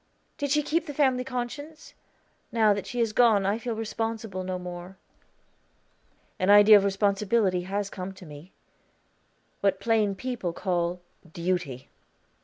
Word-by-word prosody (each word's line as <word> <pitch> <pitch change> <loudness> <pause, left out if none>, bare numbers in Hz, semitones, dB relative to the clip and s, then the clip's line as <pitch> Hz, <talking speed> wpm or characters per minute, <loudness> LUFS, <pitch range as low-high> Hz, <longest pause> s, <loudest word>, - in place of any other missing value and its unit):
Did 285 -1 -1
she 300 +2 +2
keep 330 +4 -1
the 290 - -6
family 260 -3 +2
conscience? 265 +5 -6 0.6
Now 220 -3 +4
that 200 - -5
she 245 - -6
has 225 -2 0
gone 220 -5 +4
I 205 +3 0
feel 235 -1 -4
responsible 225 -3 -4
no 185 0 -3
more." 180 +1 -8 1.4
"An 185 - +1
idea 205 +1 +9
of 200 - +1
responsibility 200 -1 +1
has 200 +1 -3
come 185 0 -6
to 185 - -13
me 150 +4 -12 1.1
what 195 -1 +1
plain 215 -2 +1
people 235 -6 -4
call 175 -1 -2 0.3
Duty." 170 -7 -3
205 Hz, 140 wpm, -27 LUFS, 185-235 Hz, 1.4 s, idea